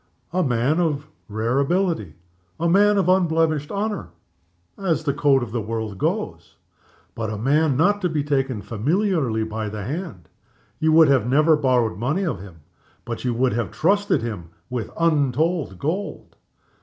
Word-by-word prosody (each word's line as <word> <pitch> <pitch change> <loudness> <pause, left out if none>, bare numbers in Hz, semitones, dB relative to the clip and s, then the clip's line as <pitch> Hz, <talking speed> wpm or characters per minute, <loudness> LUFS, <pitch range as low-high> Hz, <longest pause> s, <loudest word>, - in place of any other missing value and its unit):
A 185 - +2
man 130 +2 +1
of 150 -4 -1 0.2
rare 115 +5 0
ability; 160 - 0 0.4
a 170 - +1
man 205 +4 +4
of 195 - +2
unblemished 160 -5 +2
honor 205 - -3 0.7
(as 170 -5 -1
the 140 -3 0
code 140 -2 +3
of 115 - -6
the 115 0 -2
world 110 -2 -4
goes); - - -3 0.6
but 115 -1 -3
not 110 - -3
a - - -5
man 155 - +2
to 180 -3 0
be 155 -3 -1
taken 135 -6 -1
familiarly 140 - 0
by 110 0 -4
the 105 -1 -6
hand. 145 - -6 0.5
You 160 0 +2
would 160 -2 +7 0.2
never 150 +5 +4
have 150 - -5
borrowed 120 -7 +1
money 140 - 0
of 125 - -2
him 90 -5 -13 0.4
but 115 -1 -5
you 125 -2 -1
would 125 0 +1
have 120 +1 -1
trusted 200 - +1
him 100 -8 -5 0.2
with 125 -3 -3
untold 155 - +1
gold. 180 - -4
140 Hz, 160 wpm, -22 LUFS, 115-165 Hz, 0.7 s, would